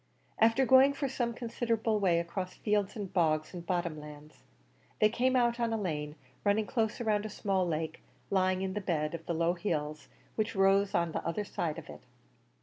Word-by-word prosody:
After 230 +4 +4
going 265 +2 +6
for 280 0 -2
some 245 -3 -1
considerable 230 -2 -1
way 180 -4 +3
across 180 +2 -4
fields 205 -2 0
and 200 -3 -6
bogs 155 -3 +1
and 175 -2 -6
bottom 170 -3 -2
lands, 150 0 -12 0.6
they 215 - +5
came 255 +3 +1
out 240 -1 +2
on 235 -1 +1
a 225 - 0
lane, 150 -6 -3 0.3
running 210 +1 +2
close 220 -1 -1
round 215 -3 +1
a 215 - -4
small 190 -3 0
lake 160 -1 -3 0.3
lying 185 -1 +2
in 190 -1 -2
the 210 - -3
bed 155 -4 -1
of 165 -1 -5
the 170 - -1
low 170 +1 +2
hills 150 -6 -3 0.3
which 215 0 -2
rose 195 +1 +3
on 170 -1 +1
the - - -3
other 170 +5 -2
side 160 -5 -3
of - - -8
it. - - -10
195 Hz, 195 wpm, -31 LUFS, 170-220 Hz, 0.6 s, going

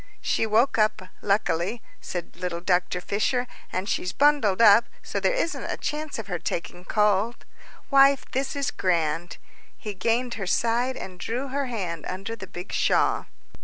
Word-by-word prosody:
"She 225 - 0
woke 230 +3 +3
up, 215 -3 +2 0.2
luckily," 200 +1 0 0.2
said 175 -2 -6
little 180 -2 -3
Dr. 180 0 +1
Fisher, 215 +7 0 0.3
"and 185 +2 -2
she's 180 - -1
bundled 285 -10 +3
up 230 +1 +7 0.2
so - - -3
there - - +2
isn't 360 -9 -1
a - - -3
chance 305 0 -3
of 225 - -5
her 180 -3 -3
taking 175 +2 -4
cold. 210 +3 +1 0.5
Wife, 275 0 +6
this 270 +2 -1
is 280 -1 -1
grand!" 170 -2 0 0.4
He 210 - -5
gained 235 +5 0
her 195 - -3
side, 240 +5 +1
and 185 -1 -8
drew 250 +8 -3
her 280 +1 -1
hand 180 -9 -4
under 195 +5 -4
the 195 -4 -9
big 180 0 -8
shawl. - - +2
210 Hz, 165 wpm, -25 LUFS, 180-250 Hz, 0.5 s, up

